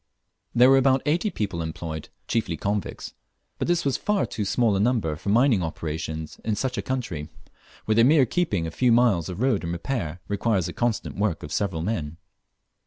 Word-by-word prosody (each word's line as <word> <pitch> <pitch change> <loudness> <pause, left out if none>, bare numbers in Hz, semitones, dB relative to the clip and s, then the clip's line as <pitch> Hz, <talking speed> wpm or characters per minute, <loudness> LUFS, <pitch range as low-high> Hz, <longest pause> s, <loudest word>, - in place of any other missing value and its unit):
There 125 +2 +7
ware 135 - +7
about 135 0 +3
eighty 170 +8 +1 0.2
men 85 - -2
employed, 80 -1 -5 0.2
chiefly 110 -8 -1
convicts; 100 +3 -3 0.5
but - - -1
this 175 -2 +1
was 140 - +1
far 210 -2 +1
too 105 - -4
small 110 +1 +2
a - - +1
number 105 -8 +1
for 90 - -5
mining 115 -1 +4
operations 80 -1 -4
in 110 - 0
such 125 +4 -2
a - - -2
country, 95 - -4 0.6
where 110 - +2
the 115 +1 +5
mere 140 +1 +6
keeping 110 - 0
a 80 - -4
few 125 +8 +2
miles 115 -9 +3
of 90 +4 -5
road 130 -7 +2
in 85 - -3
repair 85 - -3
requires 100 -2 0
the - - -4
constant 120 -3 -1
work 100 -5 0
of 75 - -6
several 90 -6 -1
men. 80 -6 -3
105 Hz, 190 wpm, -25 LUFS, 85-125 Hz, 0.6 s, There